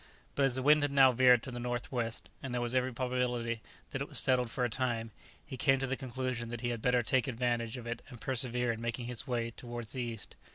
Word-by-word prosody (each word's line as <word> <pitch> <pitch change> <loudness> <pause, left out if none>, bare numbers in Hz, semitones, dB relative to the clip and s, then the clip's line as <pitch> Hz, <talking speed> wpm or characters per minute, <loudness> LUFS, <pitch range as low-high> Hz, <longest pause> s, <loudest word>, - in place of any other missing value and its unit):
But 140 - +3
as 130 -2 +2
the 130 - -1
wind 150 +2 +6
had 145 - +2
now 135 -2 +7
veered 125 -1 +6
to 135 - -5
the 120 - -5
north 120 0 -3
west, 115 -3 -3
and 135 - -5
there 120 0 -1
was 120 0 -2
every 130 0 +2
probability 125 -2 -1 0.3
that - - -3
it - - -2
was - - -3
settled 125 -2 +3
for 125 - -2
a - - +3
time, 115 -2 -1 0.3
he 135 -3 -7
came 135 0 +4
to 135 - -1
the 135 0 -1
conclusion 130 -2 -3
that 120 -1 -5
he 120 - 0
had 120 -2 -3
better 125 0 +3
take 130 +4 +2
advantage 120 -1 -1
of 120 - -8
it 120 0 -4
and 120 - -10
persevere 125 0 0
in 115 0 -5
making 115 0 -2
his 125 +2 -5
way 120 -2 -1
towards 120 -1 -7
the 130 - -3
east. 115 -3 -5
125 Hz, 255 wpm, -32 LUFS, 120-130 Hz, 0.3 s, now